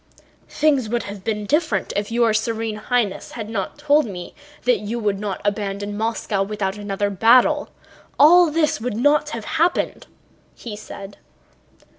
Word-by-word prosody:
"Things 280 -7 +1
would 240 +1 -1
have 200 -1 -8
been 210 -1 -2
different 290 - 0
if 205 +2 -2
your 230 -1 +3
Serene 225 0 -1
Highness 215 -2 -1
had 220 -2 -6
not 195 -4 -3
told 295 -2 +3
me 180 -4 -8 0.3
that 245 -4 +3
you 210 +4 -4
would 205 -4 -1
not 205 -2 -3
abandon 205 0 -2
Moscow 220 -2 -1
without 195 -1 -2
another 205 -1 -2
battle; 250 +9 +4 0.5
all 340 +4 +7
this 305 -6 0
would 235 -2 -3
not 290 +4 +3
have 230 -7 -6
happened," 330 +2 0 0.5
he 225 -3 -8
said. 200 -1 -10
220 Hz, 150 wpm, -21 LUFS, 205-250 Hz, 0.5 s, all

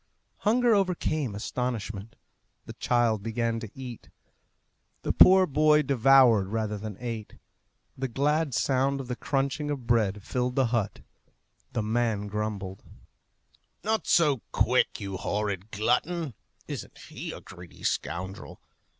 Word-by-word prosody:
Hunger 235 +2 +3
overcame 160 - 0
astonishment. 110 -2 -4 0.5
The - - -8
child 120 -4 +1
began 115 +1 -1
to 110 -2 -7
eat. 125 -3 -8 0.9
The - - 0
poor 190 0 +8
boy 150 0 +4
devoured 130 -6 +5
rather 110 0 -2
than 105 -1 -6
ate. 115 -3 -5 0.6
The 135 0 -2
glad 145 +2 0
sound 135 +1 +1
of 135 - -6
the 125 - -2
crunching 140 +3 -1
of 140 -4 -3
bread 105 -4 +1
filed 125 +2 -2
the 135 - +3
hut. 110 -4 -1 0.7
The 115 -3 -1
man 110 -2 0
grumbled, 105 -2 -4 1.0
"Not 220 +1 0
so 145 -8 +4
quick, - - +2
you 95 -1 -4
horrid 100 0 -2
glutton! 125 - 0 0.3
Isn't - - -7
he - - -7
a - - -8
greedy 90 -1 -13
scoundrel? 95 +4 -3
120 Hz, 125 wpm, -27 LUFS, 105-140 Hz, 1.0 s, poor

